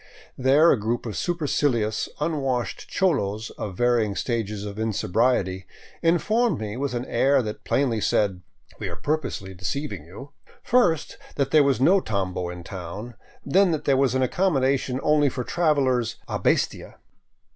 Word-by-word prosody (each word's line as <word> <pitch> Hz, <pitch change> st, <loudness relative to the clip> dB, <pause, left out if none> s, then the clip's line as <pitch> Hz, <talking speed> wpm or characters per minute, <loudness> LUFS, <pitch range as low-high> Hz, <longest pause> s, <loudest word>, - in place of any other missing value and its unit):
There 140 Hz, +6 st, +5 dB
a 125 Hz, -, +2 dB
group 115 Hz, +4 st, -2 dB
of 110 Hz, -, -5 dB
supercilious, 140 Hz, -, 0 dB
unwashed 135 Hz, -7 st, -2 dB
cholos 110 Hz, -, 0 dB
of 95 Hz, -4 st, -6 dB
varying 120 Hz, -4 st, +2 dB
stages 105 Hz, -4 st, -2 dB
of 100 Hz, +1 st, -7 dB
insobriety 95 Hz, -2 st, 0 dB, 0.3 s
informed 215 Hz, +8 st, +2 dB
me, 105 Hz, -1 st, -4 dB
with 135 Hz, 0 st, -2 dB
an 120 Hz, +1 st, -3 dB
air 135 Hz, -1 st, +2 dB
that 105 Hz, -1 st, -6 dB
plainly 125 Hz, -6 st, +1 dB
said 95 Hz, -2 st, +1 dB, 0.2 s
" -, -, -26 dB
We -, -, -4 dB
are -, -, -6 dB
pur 155 Hz, +2 st, 0 dB
posely 95 Hz, -9 st, -7 dB
deceiving 100 Hz, -, -4 dB
you," 105 Hz, -, -11 dB, 0.3 s
first, 175 Hz, -11 st, +2 dB, 0.2 s
that 140 Hz, -, 0 dB
there 155 Hz, -, +6 dB
was 140 Hz, -3 st, +2 dB
no 180 Hz, +9 st, +5 dB
tambo 95 Hz, -, -2 dB
in 90 Hz, 0 st, -8 dB
town, 95 Hz, +7 st, -7 dB, 0.3 s
then 190 Hz, +7 st, +4 dB
that 150 Hz, -1 st, -3 dB
there 140 Hz, -, +3 dB
was 130 Hz, -1 st, +2 dB
accommodation 135 Hz, -2 st, +1 dB
only 150 Hz, -1 st, +3 dB
for 125 Hz, -1 st, -4 dB
travelers 135 Hz, -7 st, +1 dB
" -, -, -35 dB
a -, -, -3 dB
bestia." -, -, 0 dB
125 Hz, 155 wpm, -24 LUFS, 105-145 Hz, 0.3 s, there